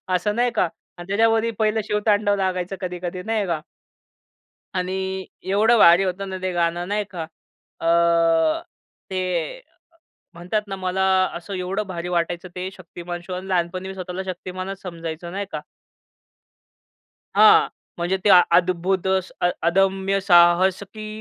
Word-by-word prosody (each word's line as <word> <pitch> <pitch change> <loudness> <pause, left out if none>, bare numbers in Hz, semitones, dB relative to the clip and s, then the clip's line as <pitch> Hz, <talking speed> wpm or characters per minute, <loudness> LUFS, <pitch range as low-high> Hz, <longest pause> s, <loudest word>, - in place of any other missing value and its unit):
असं 205 +4 0
नाही 245 +1 +2
का? 200 - +3 0.3
आणि 175 0 -9
त्याच्यावरही 225 +3 +2
पहिलं 220 0 +2
शिव-तांडव 210 0 +1
लागायचं 185 -1 -2
कधी-कधी 180 0 -4
नाही 220 -1 -1
का? 165 -3 -1 1.1
आणि 190 +1 -2 0.2
एवढं 210 +5 +3
भारी 175 -2 +7
होतं 195 +1 -3
ना 190 - -4
ते 185 0 -1
गाणं 175 +1 0
नाही 210 +1 0
का. 165 -3 -4 0.6
अ, 165 - +1 1.2
ते 190 -1 -2 0.4
अ, - - -20 0.7
म्हणतात 180 +5 -2
ना 195 - -4
मला 190 0 -1 0.3
असं 175 +4 -7
एवढं 185 +3 -2
भारी 175 -1 -5
वाटायचं 170 +1 -1
ते 185 +1 -4
शक्तिमान 175 -1 -8
शो 185 - -7
आणि 185 +1 -5
लहानपणी 185 +1 -1
मी 190 - -6
स्वतःला 185 0 -5
शक्तिमानच 185 +1 -6
समजायचो, 170 -1 -6
नाही 200 +2 -3
का. 150 - -4 1.7
हां. - - +7 0.3
म्हणजे 175 +3 0
ते, - - +5 0.2
अद्भुत 180 +2 +2
अ, 185 -1 0 0.2
अदम्य 195 +2 +2
साहस 175 0 +5
की 215 +2 -9
185 Hz, 140 wpm, -22 LUFS, 175-195 Hz, 1.7 s, भारी